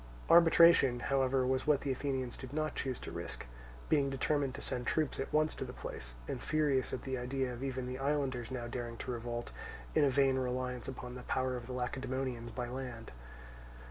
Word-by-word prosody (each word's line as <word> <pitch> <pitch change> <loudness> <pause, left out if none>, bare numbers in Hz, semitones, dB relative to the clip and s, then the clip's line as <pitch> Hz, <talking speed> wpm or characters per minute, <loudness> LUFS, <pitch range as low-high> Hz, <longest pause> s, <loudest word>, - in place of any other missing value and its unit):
Arbitration, 165 -6 +7
however, 130 +1 +2
was 130 +2 0
what 150 -2 +4
the 140 - -1
Athenians 130 -2 -2
did 130 0 -8
not 155 -1 0
choose 130 -3 -2
to - - -6
risk; - - -5 0.4
being 140 -3 +3
determined 135 0 0
to - - -7
send 125 -1 -3
troops 155 -3 +1
at 135 - -3
once 155 0 +3
to - - -4
the - - -6
place, - - -6
and - - -3
furious 145 -4 +1
at - - -4
the 130 -1 -2
idea 130 0 -1
of 120 +2 -6
even 130 -2 -2
the 130 +1 -4
islanders 135 -4 0
now 125 -2 -4
daring 120 -1 -4
to 125 - -4
revolt, 120 0 -4 0.4
in - - +4
a 140 - +5
vain 135 0 +3
reliance 125 -1 -2
upon 125 -1 -6
the 125 - -7
power 130 0 0
of 120 -1 -6
the 130 - -5
Lacedaemonians 125 -1 -2
by 120 +1 -4
land. 125 -2 -6
130 Hz, 200 wpm, -34 LUFS, 125-135 Hz, 0.4 s, Arbitration